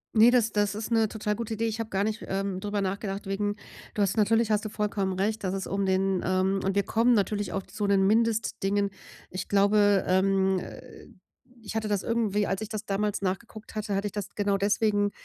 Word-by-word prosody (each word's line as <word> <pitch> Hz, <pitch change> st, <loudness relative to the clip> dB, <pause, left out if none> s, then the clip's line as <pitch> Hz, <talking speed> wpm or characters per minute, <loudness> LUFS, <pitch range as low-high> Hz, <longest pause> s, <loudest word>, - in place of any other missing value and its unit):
Ne, 225 Hz, +2 st, +8 dB
das 240 Hz, -3 st, +3 dB
das 205 Hz, -1 st, +1 dB
ist 215 Hz, +2 st, -5 dB
'ne 225 Hz, -1 st, +3 dB
total 210 Hz, -1 st, -2 dB
gute 225 Hz, 0 st, -4 dB
Idee. 225 Hz, +1 st, -1 dB
Ich 225 Hz, 0 st, -2 dB
habe 225 Hz, -1 st, -3 dB
gar 195 Hz, -1 st, 0 dB
nicht, 215 Hz, +1 st, -2 dB
ähm, 195 Hz, -1 st, -2 dB
drüber 205 Hz, +1 st, -2 dB
nachgedacht 195 Hz, +1 st, -3 dB
wegen 205 Hz, +1 st, -1 dB, 0.4 s
du 210 Hz, -, +2 dB
hast 195 Hz, -1 st, 0 dB
natürlich 225 Hz, +1 st, +3 dB
hast 210 Hz, -1 st, +2 dB
du 215 Hz, -, -4 dB
vollkommen 205 Hz, -2 st, -1 dB
recht, 205 Hz, +3 st, -1 dB
dass 185 Hz, 0 st, -1 dB
es 190 Hz, -, -3 dB
um 195 Hz, 0 st, -1 dB
den 190 Hz, 0 st, +1 dB
ähm, 185 Hz, +1 st, +1 dB
und 195 Hz, 0 st, 0 dB
wir 200 Hz, -, +3 dB
kommen 230 Hz, +4 st, +3 dB
natürlich 205 Hz, -1 st, 0 dB
auch 195 Hz, -, -2 dB
zu 205 Hz, +1 st, -4 dB
den 195 Hz, -1 st, +3 dB
Mindestdingen. 205 Hz, -2 st, +1 dB, 0.4 s
Ich 185 Hz, -, -5 dB
glaube, 205 Hz, 0 st, +4 dB
ähm, 190 Hz, 0 st, +2 dB
äh, -, -, -11 dB, 0.6 s
ich 205 Hz, -, -6 dB
hatte 220 Hz, -1 st, -1 dB
das 205 Hz, -2 st, 0 dB
irgendwie 215 Hz, -3 st, +1 dB
als 195 Hz, +1 st, -2 dB
ich 215 Hz, -, -5 dB
das 215 Hz, -1 st, -5 dB
damals 205 Hz, 0 st, -1 dB
nachgeguckt 215 Hz, +3 st, -4 dB
hatte, 215 Hz, -2 st, -2 dB
hatte 200 Hz, +1 st, -1 dB
ich 205 Hz, -, -2 dB
das 205 Hz, -1 st, -5 dB
genau 200 Hz, -1 st, +1 dB
deswegen, 205 Hz, 0 st, +2 dB
205 Hz, 215 wpm, -27 LUFS, 195-215 Hz, 0.6 s, Ne